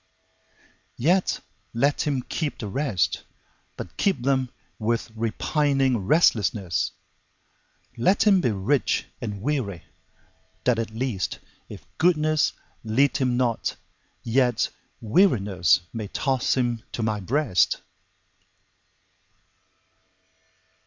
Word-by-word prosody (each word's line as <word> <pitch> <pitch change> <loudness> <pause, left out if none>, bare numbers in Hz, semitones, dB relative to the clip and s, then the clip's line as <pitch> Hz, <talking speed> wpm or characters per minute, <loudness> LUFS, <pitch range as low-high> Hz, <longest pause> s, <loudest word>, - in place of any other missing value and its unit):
Yet 180 +9 +2 0.3
let 140 +5 +1
him 135 -4 0
keep 150 +1 -3
the 105 - -5
rest, 110 -4 0 0.5
But - - -8
keep 190 -11 +1
them 130 -1 +1 0.3
with 115 +1 -1
repining 130 0 +1
restlessness; 105 - +2 1.0
Let 185 - +3
him 195 -3 +5
be 125 - +2
rich 110 +7 0 0.2
and 105 -4 -5
weary, 120 - -2 0.8
that 125 -2 +2
at 115 - -2
least, 110 -3 -2 0.3
If - - -10
goodness 155 -2 +3 0.3
lead 125 +6 +2
him 125 -3 +1
not, 120 -3 0 0.5
yet 120 0 +2 0.3
wearinessMay 100 - +2
toss 135 -3 +1
him 120 -3 0
to 115 - -2
My 110 -1 0
breast. 120 0 +1
120 Hz, 95 wpm, -25 LUFS, 110-145 Hz, 1.0 s, him